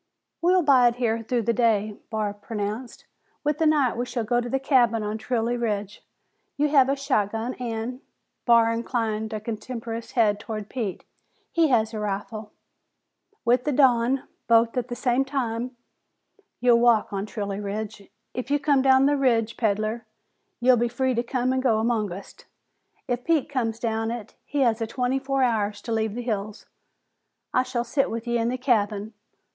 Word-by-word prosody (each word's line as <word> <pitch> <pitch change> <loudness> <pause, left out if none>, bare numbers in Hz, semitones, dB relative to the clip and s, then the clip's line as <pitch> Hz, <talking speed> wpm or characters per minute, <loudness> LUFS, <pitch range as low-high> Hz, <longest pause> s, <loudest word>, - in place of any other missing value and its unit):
"We'll 360 +1 +4
bide 250 -5 +5
here 230 -2 0
through 235 +1 -1
the 235 +2 +1
day," 215 -3 +1
Barr 215 -2 -1
pronounced. 210 +3 -5 0.4
"With 295 0 0
the 320 - +3
night 290 -5 +3
we 245 +2 -2
shall 240 -1 -2
go 240 +3 +1
to 240 +2 -3
a - - +1
cabin 240 -5 +3
on 210 +1 -3
Trilley 240 0 -1
Ridge. 210 -3 -3 0.5
You 295 +1 +2
have 270 -3 +5
a 275 - +2
shotgun 230 -4 -1
an'," 240 +1 -4 0.5
Barr 230 -1 +5
inclined 225 -2 -2
a 215 - -3
contemptuous 230 +1 -6
head 210 -4 +3
toward 215 -1 -6
Pete, 220 -8 -4 0.5
"he 335 -1 +3
has 230 -4 +2
a 215 - -3
rifle. 210 +1 -4 0.9
With 245 +1 +3
the 295 - 0
dawn, 255 -1 +3 0.2
both 230 0 +4
at 250 -1 -1
the 240 - -5
same 250 +1 +1
time, 250 -2 -3 0.8
ye'll 240 -1 +5
walk 235 -3 +3
on 195 +1 -2
Trilley 200 -2 -4
Ridge. 210 0 -5 0.2
If 250 +1 -5
you 290 - +3
come 285 -2 +2
down 265 0 +5
the 290 +1 +3
ridge, 230 -4 +2
peddler, 215 +1 -1 0.5
ye'll 250 0 +5
be 240 +1 +2
free 255 +2 0
to 235 - +1
come 255 +1 -1
an' 260 - +1
go 250 -4 +2
amongst 215 -4 -2
us. - - -26 0.6
If 245 0 -2
Pete 320 -2 +1
comes 235 -5 -1
down 225 -1 -1
it, 235 -3 -6
he 290 0 -1
has 230 -3 +2
a 225 - -1
twenty 250 +3 -1
four 270 0 0
hours 210 -4 0
to 230 - -5
leave 220 -1 0
the 245 - -4
hills. 215 -2 -4 0.9
I 255 - +4
shall 255 -2 -2
sit 270 +3 0
with 230 +1 -4
ye 235 0 0
in 230 +1 +1
the 255 - -2
cabin. 215 -4 0
235 Hz, 180 wpm, -25 LUFS, 220-255 Hz, 0.9 s, bide